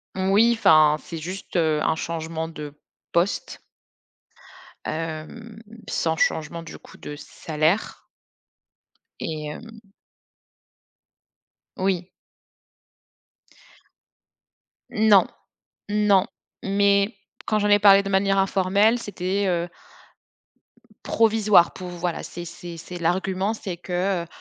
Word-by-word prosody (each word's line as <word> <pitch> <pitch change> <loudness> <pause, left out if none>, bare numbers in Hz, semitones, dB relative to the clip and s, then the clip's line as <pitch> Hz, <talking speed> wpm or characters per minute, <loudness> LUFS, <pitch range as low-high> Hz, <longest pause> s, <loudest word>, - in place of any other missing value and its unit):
Moui. 200 +5 +4
Enfin, 155 -8 +5
c'est 165 - -8
juste, 185 +6 -7
heu, 160 -3 +2
un 160 - +1
changement 160 0 -4
de 150 -3 -8 0.4
poste 170 +3 -1 1.2
hem, 165 +8 -6 0.3
sans 160 -1 -1
changement, 160 +2 -1
du 165 - -10
coup, - - -16
de 150 - -8
salaire. 155 +6 -2 1.1
Et 155 -1 -4
hem 220 +5 -11 1.9
Oui. 185 -1 -1 2.8
Non. 210 -3 +5 0.6
Non 205 -2 +3 0.4
mais, 200 +1 +2 0.3
quand 215 - +1
j'en 205 - +1
ai 205 0 +6
parlé 200 -1 +7
de 195 - -4
manière 195 0 +2
informelle, 195 +3 +3
c'était, 200 -2 -2
heu 175 -1 0 1.4
provisoire 215 -5 +4
pouv 185 -1 -8
voilà, 175 -1 -2
c'est 175 0 -8
c'est 170 0 -9
c'est 175 +2 -8
l'argument, 190 +4 0
c'est 190 -4 -5
que, 180 +1 -1
heu - - -12
185 Hz, 100 wpm, -24 LUFS, 165-200 Hz, 2.8 s, parlé